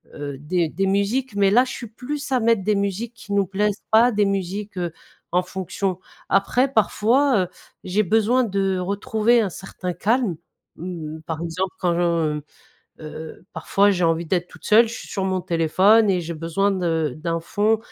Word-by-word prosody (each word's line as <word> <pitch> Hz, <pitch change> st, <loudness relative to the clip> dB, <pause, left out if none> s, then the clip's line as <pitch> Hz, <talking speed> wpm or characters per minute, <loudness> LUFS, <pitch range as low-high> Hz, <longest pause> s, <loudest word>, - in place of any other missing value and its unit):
heu, 145 Hz, -2 st, -6 dB
des 165 Hz, +3 st, 0 dB
des 190 Hz, +5 st, -1 dB
musiques 205 Hz, +5 st, 0 dB
mais 200 Hz, -1 st, +3 dB
là 245 Hz, +5 st, +6 dB
je 260 Hz, -, -6 dB
suis 240 Hz, -, -6 dB
plus 275 Hz, +6 st, -6 dB
à 255 Hz, -, +3 dB
mettre 230 Hz, -3 st, +2 dB
des 210 Hz, +2 st, +2 dB
musiques 200 Hz, +4 st, -2 dB
qui 210 Hz, -3 st, -8 dB
nous 200 Hz, -1 st, +3 dB
plaisent, 205 Hz, +2 st, -1 dB
pas 230 Hz, +3 st, +6 dB
des 210 Hz, -1 st, +2 dB
musiques, 195 Hz, +1 st, -3 dB
heu, 175 Hz, -2 st, -2 dB, 0.4 s
en 180 Hz, -, +3 dB
fonction. 185 Hz, 0 st, -3 dB, 0.3 s
Après 245 Hz, +7 st, +2 dB
parfois, 230 Hz, +2 st, +3 dB
heu, 180 Hz, -, -4 dB, 0.4 s
j'ai 185 Hz, +3 st, +1 dB
besoin 225 Hz, +6 st, +3 dB
de 195 Hz, -3 st, 0 dB
retrouver 210 Hz, +5 st, +1 dB
un 205 Hz, -, -1 dB
certain 180 Hz, 0 st, -6 dB
calme, 220 Hz, -2 st, +1 dB, 0.4 s
mmh, 160 Hz, -3 st, -6 dB
par 160 Hz, 0 st, -5 dB
exemple 180 Hz, +3 st, -3 dB
quand, 175 Hz, -1 st, +1 dB
mmh, 165 Hz, -3 st, 0 dB, 0.6 s
heu, 155 Hz, +2 st, -9 dB
parfois 200 Hz, +1 st, +2 dB
j'ai 185 Hz, -3 st, 0 dB
envie 165 Hz, +1 st, +1 dB
d'être 175 Hz, +1 st, -1 dB
toute -, -, -16 dB
seule, 225 Hz, +2 st, +5 dB
je 230 Hz, -, -6 dB
suis -, -, -10 dB
sur 195 Hz, -2 st, -2 dB
mon 185 Hz, -1 st, 0 dB
téléphone 185 Hz, +6 st, +4 dB
et 180 Hz, -2 st, +1 dB
j'ai 170 Hz, +1 st, -5 dB
besoin 165 Hz, +5 st, 0 dB
de 165 Hz, -6 st, 0 dB
d'un 165 Hz, +1 st, -2 dB
fond 210 Hz, +6 st, +1 dB
195 Hz, 185 wpm, -22 LUFS, 175-215 Hz, 0.6 s, là